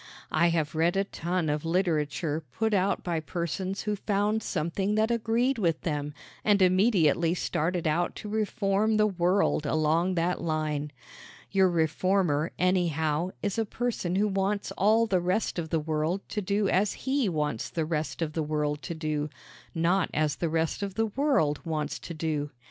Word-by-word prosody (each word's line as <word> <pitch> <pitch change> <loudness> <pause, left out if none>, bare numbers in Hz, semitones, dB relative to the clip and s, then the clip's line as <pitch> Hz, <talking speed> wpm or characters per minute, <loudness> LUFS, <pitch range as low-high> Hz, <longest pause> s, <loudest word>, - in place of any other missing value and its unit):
I 170 +2 +3
have 160 -3 0
read 165 +3 +2
a 195 - +3
ton 175 -3 -2
of 150 0 -1
literature 160 -3 0
put 220 -1 0
out 195 0 +1
by 170 -2 -1
persons 175 +4 -3
who 210 -1 -1
found 205 +2 0
something 195 +5 -1
that 220 +2 +2
agreed 235 +3 +1
with 165 -5 +1
them 150 -2 -3 0.3
and 205 -1 +4
immediately 180 -4 +3
started 170 0 -1
out 165 +3 +1
to - - -7
reform 215 0 +1
the 215 - +4
world 180 -5 +1
along 160 +5 +2
that 175 +1 0
line. 155 -2 -2 0.6
Your 190 -1 +4
reformer, 165 -1 +1
anyhow, 170 -3 +1
is 205 +1 -1
a - - +3
person 215 -6 -2
who 205 +2 +3
wants 200 +1 -1
all 220 +4 +3
the 190 -5 +1
rest 180 +1 0
of 160 -2 -4
the 165 - +1
world 155 +4 -2
to 210 - -2
do 200 +1 0
as 195 +3 +2
he 265 -5 +1
wants 150 -8 -2
the 160 -2 -2
rest 155 +1 -2
of 155 -1 -4
the 160 - -1
world 150 -1 -1
to 170 - -5
do, 155 -2 -2 0.5
not 175 +3 +2
as 150 -2 +1
the 170 - -1
rest 160 +4 -1
of 200 -2 -4
the 225 - +2
world 220 - +1
wants 155 -3 -3
to 170 - -8
do. 155 -2 -2
175 Hz, 170 wpm, -28 LUFS, 155-200 Hz, 0.6 s, and